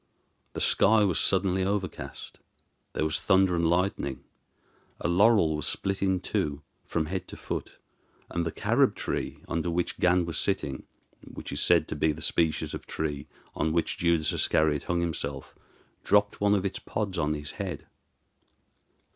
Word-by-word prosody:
The - - -4
sky 110 0 +5
was 95 -5 +2
suddenly 95 -1 +2
overcast, 95 -1 -4 0.5
there - - -1
was 80 0 0
thunder 95 -2 +3
and 85 -1 +2
lightning, 85 -7 0 0.8
a - - -1
laurel 90 -2 +4
was 75 - -1
split 95 0 -1
in 95 -1 +2
two 75 -1 -2 0.2
from 80 - -1
head 95 +3 -4
to - - -10
foot, - - -5 0.5
and 85 - -2
the 80 - -2
Carob - - +2
tree - - -4
under 85 +1 -1
which 85 +1 -2
Gan 90 0 +3
was 85 - -3
sitting, 65 -2 -1 0.4
which - - -9
is - - -2
said - - +4
to - - -3
be 80 - +2
the 75 +1 -4
species 80 -2 +1
of - - -7
tree 75 -3 -3 0.3
on 80 +1 -1
which 85 - 0
Judas 85 -3 +2
Iscariot 75 -2 +2
hung 85 0 0
himself, 70 -5 -4 0.5
dropped 105 0 +2
one 105 0 +4
of 100 -1 -1
its 95 - -2
pods 100 -5 -3
on 75 -1 +1
his 75 0 -5
head. 90 -6 -5
85 Hz, 165 wpm, -28 LUFS, 80-95 Hz, 0.8 s, sky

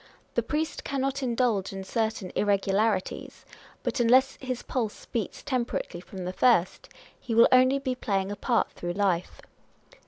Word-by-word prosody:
The - - +2
priest 310 +1 -2
cannot 275 0 -2
indulge 235 -6 0
in 195 0 -6
certain 220 -2 -2
irregularities; 200 0 0 0.4
but - - -2
unless 255 +3 +4
his 255 -2 -4
pulse 230 -5 -3
beats 225 -5 -4
temperately 240 -8 -2
from 185 0 -8
the 180 - -3
first, 210 -6 +2 0.3
he 230 - -3
will 230 - +8
only 255 +2 +5
be 270 -2 -2
playing 195 -6 -1
ja 205 - -3
part 235 +3 0
through 175 0 -5
life. 185 -3 -1
225 Hz, 150 wpm, -27 LUFS, 195-255 Hz, 0.4 s, will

